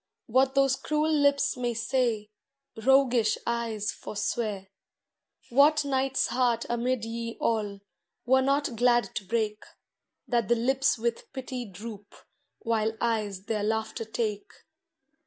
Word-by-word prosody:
What 260 +3 +2
those 275 -1 +4
cruel 305 +1 0
lips 285 -2 +3
may 245 -2 -2
say, 230 -2 0 0.4
Roguish 245 -2 +3
eyes 230 -3 -1
forswear. 205 -2 -3 0.8
What 290 +4 +5
knight's 265 -1 +1
heart 240 -2 +1
amid 240 0 -1
ye 230 0 -5
all 205 -3 -1 0.4
Were 260 +2 +4
not 275 -1 +1
glad 240 +1 +2
to 210 - -3
break, 215 +1 -1 0.7
That 235 -4 +1
the 240 - +4
lips 265 +4 +2
with 235 +1 -3
pity 255 -2 -5
droop. 205 +1 -10 0.5
While 220 -1 0
eyes 210 -5 -1
their 215 0 -2
laughter 220 +1 -2
take 215 -2 -3
235 Hz, 120 wpm, -28 LUFS, 220-260 Hz, 0.8 s, What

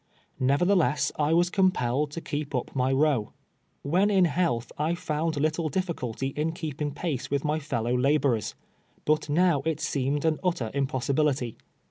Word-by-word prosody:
Nevertheless, 145 0 +2
I 150 +1 +2
was 175 +1 +3
compelled 150 -8 +1
to 165 +3 -6
keep 145 -2 -4
up 125 - -3
my 130 0 +1
row. 135 -5 +1 0.5
AYhen 180 +8 +3
in 190 -3 +5
health 160 -8 0
I 155 +3 0
found 160 -2 -2
little 155 +2 0
difficulty 135 -7 -2
in 150 +4 -2
keeping 150 -4 -4
pace 140 -3 -3
with 140 0 -1
my 150 +1 +1
fellow 125 -5 -1
laborers, 135 -3 +1 0.5
but 155 0 +1
now 165 -1 +3
it 160 -1 -1
seemed 140 -1 -1
to 160 - +4
be 155 - -3
an - - -18
utter 150 -12 -1
impossibility. 135 -2 0
150 Hz, 160 wpm, -27 LUFS, 135-165 Hz, 0.5 s, in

